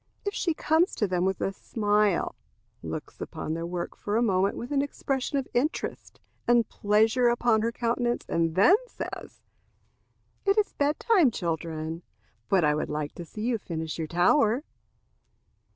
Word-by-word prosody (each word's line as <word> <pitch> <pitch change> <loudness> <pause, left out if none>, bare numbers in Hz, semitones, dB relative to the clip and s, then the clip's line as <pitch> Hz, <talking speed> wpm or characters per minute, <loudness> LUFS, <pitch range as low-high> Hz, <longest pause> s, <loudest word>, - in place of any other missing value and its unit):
If 405 - -1
she 335 -6 0
comes 320 +4 +2
to 210 - +1
them 180 -1 0
with 190 -1 -1
a 195 - -1
smile, 210 -2 +1 0.5
looks - - -7
upon 155 - -4
their 165 +1 -3
work 175 0 -4
a 215 +3 +2
moment 195 -3 +2
with 240 - -6
an 280 -1 +2
expression 280 -1 -2
of 270 - -2
interest 280 +6 -2 0.3
and 240 -2 +4
pleasure 220 +4 +2
upon 235 -2 +3
her 230 +1 0
countenance, 240 +1 -1
and 165 -1 0
then 345 - +6
says, - - -8 1.0
"It 395 +1 +2
is 425 - +2
bed 290 +1 0
time, 385 - +4
children, 165 -3 -3 0.5
but 190 -3 +4
I 150 0 +4
would 150 - -2
like 150 0 -3
to 175 - -8
see 210 - -8
you 235 -1 0
finish 160 -4 -5
your 160 - -2
tower." 220 - +3
215 Hz, 160 wpm, -27 LUFS, 170-255 Hz, 1.0 s, then